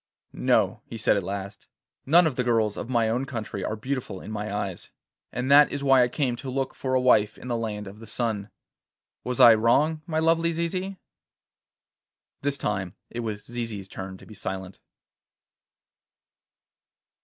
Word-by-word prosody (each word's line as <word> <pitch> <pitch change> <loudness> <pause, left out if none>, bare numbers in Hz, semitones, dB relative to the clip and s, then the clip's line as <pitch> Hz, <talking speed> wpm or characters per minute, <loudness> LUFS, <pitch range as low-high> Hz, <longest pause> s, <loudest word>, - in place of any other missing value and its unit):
'No,' - - +2
he 115 - -7
said 110 - +3
at 100 - +1
last. 100 +1 -6 0.4
'None 170 +5 +6
of 155 -5 0
the 125 - 0
girls 115 -3 +1
of - - -6
my 120 -3 +2
own 120 +4 0
country 110 -7 -5
are 110 - -2
beautiful 125 -4 -4
in 110 - -9
my 105 -1 -4
eyes, 100 -3 -4 0.4
and 125 +2 -2
that 145 +1 +8
is 140 0 -4
why 135 -2 +6
I 125 - +4
came 125 -1 -1
to 135 - -6
look 135 0 -2
for 130 -1 -2
a - - +4
wife 105 -5 +3
in 125 - -9
the 120 - 0
land 110 -2 -3
of 100 +2 -10
the 115 - -11
sun. 110 -3 -2 0.7
Was 125 -1 -3
I 115 - +10
wrong, 140 +8 +3
my 160 -2 -2
lovely 165 +1 +2
Zizi?' 185 +4 -2 1.4
This 140 0 -1
time 95 -6 -2 0.2
it 120 - -5
was 110 -3 -4
Zizi's 115 -5 -5
turn 95 0 -7
to - - -15
be 110 - -12
silent. 95 -2 -6
115 Hz, 175 wpm, -26 LUFS, 105-135 Hz, 1.4 s, I